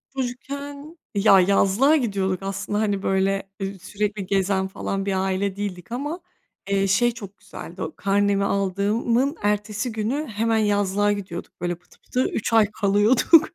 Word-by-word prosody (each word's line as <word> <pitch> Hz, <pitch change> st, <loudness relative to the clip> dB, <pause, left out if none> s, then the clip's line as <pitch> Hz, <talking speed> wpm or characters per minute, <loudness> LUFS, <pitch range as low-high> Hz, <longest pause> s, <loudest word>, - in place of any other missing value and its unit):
Çocukken 280 Hz, +4 st, -5 dB, 0.2 s
ya 200 Hz, -1 st, +6 dB
yazlığa 200 Hz, -, +4 dB
gidiyorduk 195 Hz, -, 0 dB
aslında 195 Hz, +1 st, -2 dB
hani 205 Hz, -2 st, 0 dB
böyle, 195 Hz, 0 st, 0 dB
ııı, 195 Hz, 0 st, -4 dB
sürekli 205 Hz, +2 st, -3 dB
gezen 190 Hz, 0 st, +1 dB
falan 195 Hz, 0 st, -3 dB
bir 195 Hz, -, 0 dB
aile 190 Hz, +1 st, -1 dB
değildik. 200 Hz, -2 st, -5 dB
Ama, 290 Hz, +8 st, -3 dB, 0.5 s
eee, 195 Hz, 0 st, +2 dB
şey 235 Hz, +6 st, +3 dB
çok 205 Hz, -4 st, -10 dB
güzeldi. -, -, -10 dB
O -, -, -4 dB
karnemi 200 Hz, 0 st, +1 dB
aldığımın 210 Hz, -, +1 dB
ertesi 210 Hz, +3 st, -1 dB
günü 230 Hz, +8 st, -2 dB
hemen 225 Hz, 0 st, 0 dB
yazlığa 205 Hz, -1 st, +2 dB
gidiyorduk. 185 Hz, -6 st, -6 dB
Böyle, 175 Hz, 0 st, -1 dB
pıtı 175 Hz, -, -25 dB
pıtı 255 Hz, +1 st, -1 dB
3 225 Hz, -, -2 dB
ay 225 Hz, -2 st, +6 dB, 0.2 s
kalıyorduk. 210 Hz, -, +5 dB
205 Hz, 145 wpm, -23 LUFS, 195-230 Hz, 0.5 s, ya